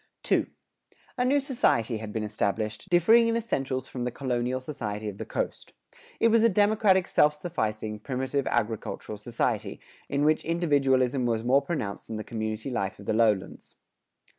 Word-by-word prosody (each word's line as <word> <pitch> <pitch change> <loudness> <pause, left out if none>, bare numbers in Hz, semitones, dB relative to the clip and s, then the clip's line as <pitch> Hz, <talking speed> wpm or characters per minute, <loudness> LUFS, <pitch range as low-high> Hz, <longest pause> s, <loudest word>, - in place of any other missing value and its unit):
II. - - +3 0.7
A 250 - 0
new 275 +3 +3
society 130 - +1
had 110 -1 -7
been 110 0 -2
established, 105 +1 -2
differing 220 +7 +5
in 230 - +1
essentials 135 - -2
from 125 - -5
the 125 - 0
colonial 125 0 -2
society 110 -6 -5
of 100 -1 -6
the - - -5
coast. - - -4 0.5
It 230 - +4
was 230 0 +4
a 230 - +5
democratic 205 -2 +3
self 150 0 +3
sufficing, 110 -10 -3
primitive 130 +3 -2
agricultural 110 -1 -2
society, 115 +2 -2 0.3
in 140 +1 +1
which 155 0 +3
individualism 135 -6 +2
was 115 -1 0
more 130 +4 +4
pronounced 140 -9 -4
than 110 - -5
the 110 - -4
community 110 +2 -4
life 100 -5 -2
of 100 - -12
the - - 0
lowlands. 110 -3 0
130 Hz, 165 wpm, -27 LUFS, 110-165 Hz, 0.7 s, differing